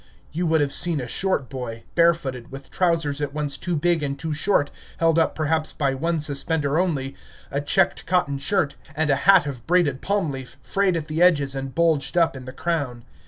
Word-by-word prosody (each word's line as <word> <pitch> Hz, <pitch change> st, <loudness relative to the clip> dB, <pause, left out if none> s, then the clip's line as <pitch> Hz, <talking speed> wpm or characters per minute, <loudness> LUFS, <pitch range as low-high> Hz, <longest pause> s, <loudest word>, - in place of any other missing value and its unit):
You 170 Hz, +3 st, -1 dB
would 160 Hz, -1 st, +3 dB
have 140 Hz, -1 st, 0 dB
seen 170 Hz, -4 st, +2 dB
a 125 Hz, -, -4 dB
short 185 Hz, -2 st, -1 dB
boy, 120 Hz, -3 st, -6 dB
barefooted, 160 Hz, -8 st, +1 dB
with 135 Hz, 0 st, -10 dB
trousers 165 Hz, -5 st, 0 dB
at 145 Hz, 0 st, -3 dB
once 145 Hz, -2 st, -1 dB
too 175 Hz, +3 st, -3 dB
big 170 Hz, +1 st, +1 dB
and 140 Hz, -1 st, -2 dB
too 160 Hz, +1 st, -3 dB
short, 150 Hz, -1 st, +1 dB, 0.3 s
held 165 Hz, 0 st, +3 dB
up 165 Hz, -, +1 dB
perhaps 155 Hz, 0 st, -1 dB
by 140 Hz, -3 st, 0 dB
one 165 Hz, +4 st, -1 dB
suspender 150 Hz, +1 st, 0 dB
only, 145 Hz, -7 st, -1 dB, 0.4 s
a 140 Hz, -, -1 dB
checked 145 Hz, -, +1 dB
cotton 170 Hz, -6 st, +1 dB
shirt, 160 Hz, -1 st, 0 dB, 0.2 s
and 155 Hz, -1 st, +1 dB
a -, -, +4 dB
hat 190 Hz, -6 st, +7 dB
of 130 Hz, -5 st, -7 dB
braided 165 Hz, -6 st, +2 dB
palm 200 Hz, -6 st, 0 dB
leaf, 130 Hz, -2 st, -8 dB
frayed 195 Hz, -2 st, +1 dB
at 155 Hz, -2 st, -5 dB
the 155 Hz, +2 st, -2 dB
edges 145 Hz, -7 st, +4 dB
and 135 Hz, -1 st, -5 dB
bulged 165 Hz, -1 st, +1 dB
up 165 Hz, -4 st, +3 dB
in 130 Hz, -1 st, -9 dB
the 130 Hz, -, -7 dB
crown. 135 Hz, -6 st, -3 dB
150 Hz, 205 wpm, -23 LUFS, 140-170 Hz, 0.4 s, hat